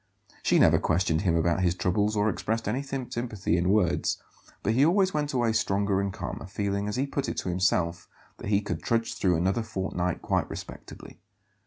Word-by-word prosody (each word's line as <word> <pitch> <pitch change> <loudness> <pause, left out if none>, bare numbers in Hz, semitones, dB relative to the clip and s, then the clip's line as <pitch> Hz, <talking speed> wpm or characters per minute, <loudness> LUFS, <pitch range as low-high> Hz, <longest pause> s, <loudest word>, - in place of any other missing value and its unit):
She - - +3
never - - +5
questioned 80 -2 +1
him 85 -4 +2
about 85 +2 +1
his 90 -1 +2
troubles 100 +5 +1
or 105 0 +2
expressed 110 +1 -1
any 130 - 0
sympathy 120 -8 -3
in 90 +1 +1
words; 95 -4 +2 0.5
but 110 - +1
he 130 +4 +4
always 185 +4 +3
went 150 -1 -1
away 120 -4 +1
stronger 100 -3 +1
and 100 0 -2
calmer, 95 - -6
feeling, 100 0 -2
as 105 - -2
he 130 +2 +1
put 140 0 -2
it - - -4
to - - -2
himself, 90 -1 0 0.3
that - - -5
he 100 -1 +3
could 105 - -4
"trudge 115 -1 0
through 95 -6 +1
another 95 +7 +1
fortnight 95 -5 -3
quite - - 0
respectably." - - -9
100 Hz, 190 wpm, -27 LUFS, 90-115 Hz, 0.5 s, never